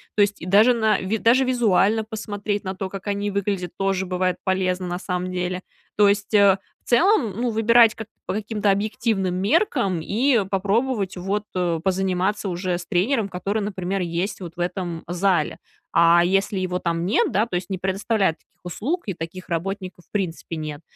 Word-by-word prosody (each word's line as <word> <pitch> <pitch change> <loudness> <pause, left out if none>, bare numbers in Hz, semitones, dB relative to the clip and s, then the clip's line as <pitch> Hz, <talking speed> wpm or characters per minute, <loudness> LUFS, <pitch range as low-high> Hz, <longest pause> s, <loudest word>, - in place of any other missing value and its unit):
То 210 - +3
есть 205 0 +2
даже 210 +6 +6
на 220 -3 +2
ви 195 +4 -1
даже 245 +5 +4
визуально 225 -3 +2
посмотреть 205 -2 -4
на 190 -1 -4
то, 190 0 -4
как 195 +1 -8
они 205 0 -1
выглядят, 195 -3 -2
тоже 195 -1 0
бывает 185 0 -1
полезно, 185 -1 0
на 175 0 -3
самом 180 -1 -3
деле. 180 0 -2 0.4
То 205 -1 +6
есть, 205 0 +1
э, 200 -2 +6 0.3
в - - -14
целом, 280 - +4
ну, 245 - +1
выбирать 225 0 +5
к 220 - -7 0.2
по - - -1
каким-то 210 0 -1
объективным 205 -2 0
меркам, 200 - +1
и 230 - +2
попробовать 200 +2 0
вот 195 +3 -2 0.4
позаниматься 190 +1 0
уже 180 0 -2
с 175 - -8
тренером, 200 +5 +1
который, 195 +4 -2
например, 195 -2 -2
есть 175 +4 -2
вот 170 -2 -8
в - - -11
этом 175 -1 -3
зале. 175 -2 0 0.3
А 170 +1 +6
если 195 +2 +1
его 180 -1 -1
там 170 -1 -1
нет, 285 - +2
да, 210 +2 +2
то 180 - -4
есть 175 0 -3
не 190 - -2
предоставляют 190 -1 0
таких - - -40
услуг, 275 - -2
и 195 - -3
таких 170 +2 -7
работников 185 +1 -4
в - - -44
принципе 170 -4 -3
нет, 155 -1 -5
195 Hz, 180 wpm, -23 LUFS, 180-215 Hz, 0.4 s, даже